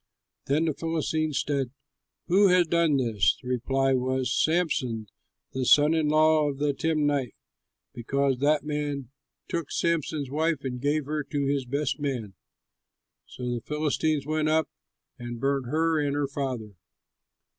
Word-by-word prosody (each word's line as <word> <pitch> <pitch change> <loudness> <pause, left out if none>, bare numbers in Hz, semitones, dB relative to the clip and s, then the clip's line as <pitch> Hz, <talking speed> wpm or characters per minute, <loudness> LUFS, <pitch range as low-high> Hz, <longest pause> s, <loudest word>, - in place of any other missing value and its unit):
Then 150 +4 +2
the 160 - 0
Philistines 155 -1 -1
said, 140 -3 0 0.6
"Who 195 +4 +5
has 180 -1 +4
done 165 -3 +2
this?" 115 -6 +2
The 125 - -12
reply 135 +2 +1
was, 130 0 0
"Samson, 145 -9 0 0.5
the 130 - -1
son 150 +5 +5
in 160 -2 +1
law 155 0 +4
of 140 - -5
the 145 0 +1
Timnite, 145 -3 0 0.6
because 135 +2 0
that 145 +1 +2
man 145 -4 -3 0.4
took 170 -4 -3
Samson's 155 -4 -1
wife 155 -1 0
and 125 -2 -4
gave 145 +1 0
her 150 +1 -2
to 145 -1 -2
his 140 -1 0
best 140 +2 -2
man." 125 -9 -3 0.9
So 125 - -10
the 120 - -3
Philistines 150 0 -1
went 155 0 0
up, 160 -1 +2 0.5
and 120 -1 -6
burnt 135 -1 0
her 160 +3 +1
and 145 -1 0
her 145 -1 0
father. 130 -6 -4
145 Hz, 145 wpm, -27 LUFS, 130-155 Hz, 0.9 s, Who